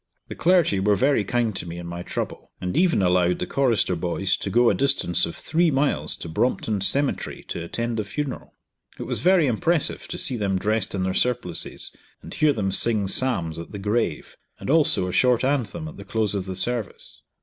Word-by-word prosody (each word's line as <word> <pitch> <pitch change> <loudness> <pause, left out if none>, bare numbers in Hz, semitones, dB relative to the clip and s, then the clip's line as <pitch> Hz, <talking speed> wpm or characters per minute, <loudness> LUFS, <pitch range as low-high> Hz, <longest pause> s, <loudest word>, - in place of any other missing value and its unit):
The - - -6
clergy 170 - +3
were 100 +2 +3
very 135 -1 +2
kind 115 0 -1
to 85 - -4
me 85 +1 -7
in 85 - -7
my 85 0 -6
trouble, - - -5
and 90 0 -4
even 170 - +3
allowed 90 -1 +2
the - - -3
chorister 120 -8 +1
boys 90 +3 0
to - - -4
go 120 +3 +4
a - - +1
distance 135 -12 +2
of 85 - -7
three 170 +2 +1
miles 140 0 +1
to - - -8
Brompton 105 +3 -1
Cemetery 140 +8 -2
to 85 - -4
attend 115 +6 -3
the 110 - -1
funeral. 135 +6 -5 0.4
It - - -5
was - - -1
very 180 -2 +4
impressive 145 +6 0
to - - -5
see 125 - +1
them 100 -3 0
dressed 105 +1 -1
in 95 - -1
their 95 0 -1
surplices, 120 -7 0 0.3
and - - -8
hear 155 -1 +3
them 100 -7 -1
sing 105 0 +2
psalms 95 -9 0
at 85 - -9
the - - -5
grave, 105 -4 -2 0.2
and - - -3
also 150 - +4
a - - -3
short 125 +3 +3
anthem 145 +4 -1
at 160 - -10
the 100 - -9
close 105 +1 -1
of 100 -2 -3
the 95 - -4
service. 115 +2 -3
110 Hz, 205 wpm, -24 LUFS, 95-135 Hz, 0.4 s, go